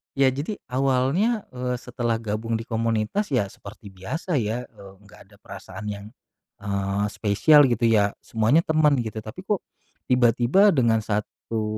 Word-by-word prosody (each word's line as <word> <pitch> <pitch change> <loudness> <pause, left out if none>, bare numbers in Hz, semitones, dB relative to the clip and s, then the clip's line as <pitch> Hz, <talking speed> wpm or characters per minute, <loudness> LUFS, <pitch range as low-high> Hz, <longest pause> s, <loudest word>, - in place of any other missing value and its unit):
Ya 135 -1 +4
jadi 140 +11 -2
awalnya, 135 - +1
eee, 125 0 -2
setelah 120 -2 -2
gabung 110 +1 -3
di 115 - -8
komunitas 115 - -1
ya 120 -7 +1
seperti 100 +2 -12
biasa 100 - -4
ya, 120 0 -2
eee, 95 -1 -14
nggak - - -17
ada - - -17
perasaan 105 - -9
yang, 100 -1 -5 0.5
eee, 100 0 -1
spesial 110 +9 +4
gitu 115 0 +2
ya 105 -3 +3
semuanya 115 +8 +2
teman 155 -4 +2
gitu 115 -2 -4
tapi 110 - -9
kok, 205 -3 0 0.5
tiba-tiba 125 - +4
dengan 115 -4 +3
1, 110 +1 -3
115 Hz, 150 wpm, -24 LUFS, 105-135 Hz, 0.5 s, Ya